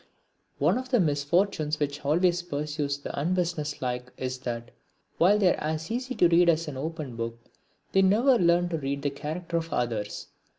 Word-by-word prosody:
One 170 - +2
of 255 0 -7
the 250 -2 +3
misfortunes 155 0 +1
which 145 0 -2
always 175 +4 +2
pursues 150 -3 -3
the 145 - -6
unbusinesslike 150 -6 -2
is 130 0 -3
that, 120 -1 -5 0.5
while 190 +5 +5
they 190 -4 +4
are - - -7
as 155 +4 -3
easy 255 +2 -3
to 175 - +5
read 170 +1 +5
as 165 0 +2
an 150 - -5
open 150 -2 -5
book, 115 0 -4 0.5
they 195 - +4
never 230 +7 +4
learn 175 0 +3
to 165 -2 -2
read 140 0 -3
the 145 - 0
character 160 +4 -4
of 165 0 -4
others. 110 -4 -2
155 Hz, 175 wpm, -27 LUFS, 140-175 Hz, 0.5 s, while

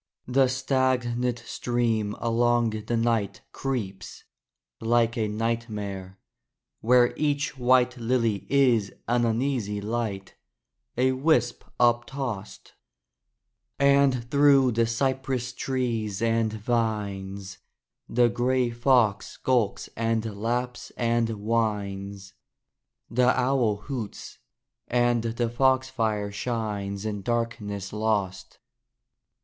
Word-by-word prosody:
The 130 +1 +4
stagnant 125 -2 0
stream 115 -4 -1
along 120 0 +2
the 110 +2 -2
night 115 -4 0
Creeps, 105 -9 -5 0.6
like 115 0 +2
a 110 -2 0
nightmare, 105 -4 -3 0.6
where 120 +1 +4
each 145 -1 -1
white 125 0 +3
Lily 115 -5 0
is 125 -7 +3 0.2
an 120 0 +2
uneasy 115 -3 -1
light, 105 -2 -3 0.6
A 130 +1 +3
wisp 130 -3 +1 0.2
up 120 -1 +4
tossed: 120 -8 -6 1.0
And 140 -3 +3
through 140 -3 +5
the 115 0 +1
cypress 130 0 -1
trees 115 -6 -2
and 115 -1 +1
vines 100 -4 -2 0.5
The 120 +1 +4
gray 125 +1 +1
fox 120 -4 +2
skulks 120 -6 0
and 115 0 0
laps 120 +4 -3
and 115 -1 +1
whines; 100 -3 -2 0.8
The 125 +2 +3
owl 125 -4 +2
hoots; 120 -4 -6 0.5
and 120 -1 +2
the 115 +1 -1
foxfire 120 -5 +1
shines 105 -3 -3
In 105 -2 -3
darkness 105 -3 -3
lost. 105 -3 -2
115 Hz, 95 wpm, -26 LUFS, 105-125 Hz, 1.0 s, through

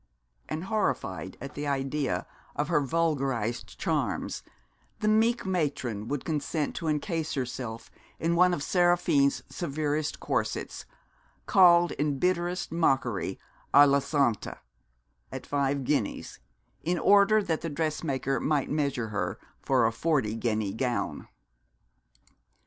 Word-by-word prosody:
And 155 +2 -3
horrified 135 - -2
at 140 +1 -8
the 145 0 -4
idea 135 -8 -1 0.3
of - - -1
her 150 - +3
vulgarised 135 -7 -1
charms - - -1 0.6
the 215 - -1
meek 225 +2 +3
matron 140 - -2
would 140 +1 -3
consent 155 -1 -2
to 165 - -3
encase 155 +1 -1
herself 125 -3 -5 0.3
in 170 +1 +1
one 180 +1 +5
of 145 -5 -2
Seraphine's 175 -6 +2
severest 150 -1 -2
corsets, - - -3 0.6
called 175 -3 +6
in 145 -1 -1
bitterest 175 +3 0
mockery 130 - 0 0.4
à 145 +1 +9
la 140 0 +4
santé 140 -5 0 0.7
at - - -6
five 140 -1 0
guineas 130 -6 -2 0.4
in 175 +3 0
order 205 +4 +5
that 165 -5 -1
the 165 - -3
dressmaker 145 -3 -1
might 150 -2 0
measure 140 -6 -1
her 105 - -2 0.2
for 130 -4 +2
a 115 - +2
forty 135 -4 0
guinea 110 -3 -1
gown. 125 +1 -2
145 Hz, 120 wpm, -28 LUFS, 130-170 Hz, 0.7 s, à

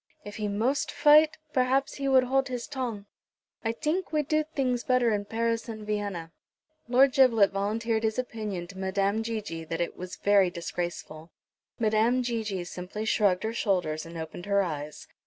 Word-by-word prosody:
If 205 +1 -8
he 210 -1 -2
most 225 +8 0
fight 305 +1 +5 0.2
perhaps 260 +1 +1
he 275 -1 -2
would 260 -1 +5
hold 270 +2 +1
his 250 -2 -4
tong. 245 -7 -4 0.6
I 225 - +1
tink 310 +10 -2
we 305 -1 +1
do 310 +2 +1
things 250 -3 0
better 255 -2 +2
in 205 -1 -1
Paris 230 +2 -1
and 215 -1 -7
Vienna." 200 -6 -3 0.6
Lord 255 +2 +5
Giblet 230 -7 +5
volunteered 220 +3 -1
his 220 -1 -1
opinion 215 -7 -4
to 195 -1 -10
Madame 195 +3 0
Gigi 215 -8 -4
that 165 +1 -4
it 170 - -2
was 180 0 -7
very 200 -2 +4
disgraceful. 170 -2 -5 0.5
Madame 225 +3 +2
Gigi 220 -6 -2
simply 180 +5 -6
shrugged 200 -4 +2
her 220 +1 -2
shoulders, 180 -9 0
and 165 0 -9
opened 160 +3 -7
her 200 -1 +3
eyes. 150 -3 -6
215 Hz, 170 wpm, -28 LUFS, 190-250 Hz, 0.6 s, fight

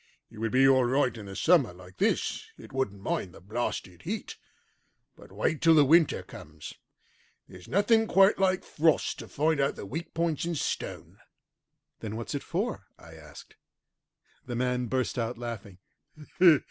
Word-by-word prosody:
It - - -12
would 115 0 -1
be 135 +3 +5
all 130 -1 +5
right 130 -1 +1
in 105 -3 -9
the 95 - -8
summer 160 - +3
like 90 +1 -15
this; - - 0
it - - -13
wouldn't 100 -7 -2
mind 90 -4 -3
the - - -12
blasted 95 -3 -4
heat. - - -5 0.8
But - - -16
wait 155 - -1
till 165 -1 +6
the 150 -2 +6
winter 160 +2 +4
comes. 75 0 -11 0.7
There's 90 -1 -13
nothing 220 +3 +3
quite 195 0 +5
like 185 -1 +2
frost 155 0 +1
to - - -8
find 155 +1 0
out 140 0 +1
the - - -8
weak 160 - -6
points 165 -2 0
in 170 0 -2
stone." - - -4 0.8
"Then 110 -1 -5
what's 115 +5 -5
it 140 - -2
for?" - - -3
I 80 - -14
asked. 75 -3 -14 0.9
The 120 - -4
man 125 0 0
burst 130 +1 -1
out 115 +1 -2
laughing. 115 -6 -7
125 Hz, 165 wpm, -28 LUFS, 100-160 Hz, 0.9 s, till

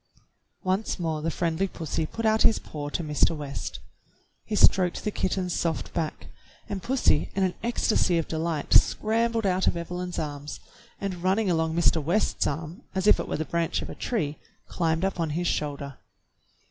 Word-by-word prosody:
Once 190 +4 0
more 160 -4 -2
the 165 - 0
friendly 170 +3 0
pussy 160 -3 -3
put 230 +6 -4
out 220 0 +3
his 225 - +5
paw 145 -1 -6
to 170 - -2
Mr. 155 +1 +2
West. 140 - -5 0.7
He 215 - -2
stroked 185 -3 +4
the 210 - -1
kitten's 185 -2 -1
soft 165 -2 -1
back, 160 -3 -3 0.4
and 200 -2 -4
pussy 250 - +2
in 195 - +2
an 185 -1 +1
ecstasy 220 -6 +2
of 165 - -1
delight 160 -2 -1
scrambled 230 0 +3
out 185 -1 +2
of - - +2
Eve 170 0 -6
lyn's 180 0 -4
arms, 145 -1 -4 0.4
and 190 -3 -4
running 190 +2 +2
along 160 -1 +1
Mr. 170 -2 +3
West's 180 +9 +1
arm 160 +4 -4
as 190 0 0
if 210 - +6
it - - -3
were - - -2
the 160 - -2
branch 170 0 -1
of - - -7
a - - -6
tree 155 -11 -2 0.3
climbed 165 +1 0
up 195 -2 -2
on 165 -2 0
his 175 - -1
shoulder. 140 -4 -2
170 Hz, 185 wpm, -27 LUFS, 160-195 Hz, 0.7 s, if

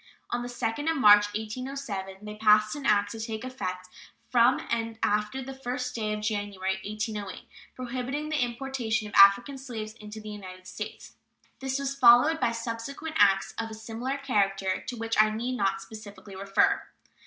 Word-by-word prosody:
On 240 - -1
the 245 - -4
2d 245 +5 -2
of 325 - 0
March, 205 -4 +7
1807, 215 -4 -6
they 210 - -6
passed 215 +1 +4
an 285 -2 -4
act, 205 -1 +3
to 225 - -7
take 220 0 -4
effect 185 -8 -5 0.4
"from 245 +1 +5
and 230 -1 -1
after 210 +5 0
the 270 +1 -7
1st 255 -1 -4
day 215 -3 -2
of 210 0 -3
January, 205 -3 -2
1808," 210 -2 -5 0.3
prohibiting 255 +4 -4
the 305 -4 +1
importation 240 -3 -2
of 205 - -12
African 240 +8 +6
slaves 225 -5 -6
into 215 -1 -10
the 215 0 -9
United 185 -3 -9
States. 185 - -8 0.4
This 265 0 -2
was 275 0 -2
followed 275 +4 +6
by 235 - +2
subsequent 235 +7 -5
acts 195 -1 +4
of 225 0 -3
a 220 - -7
similar 230 +5 -4
character, 195 -8 0
to 245 - -4
which 225 -1 +2
I 215 - +3
need 235 +4 -3
not 195 -3 0
specially 205 -1 -11
refer. 195 +1 +2
225 Hz, 170 wpm, -28 LUFS, 205-255 Hz, 0.4 s, March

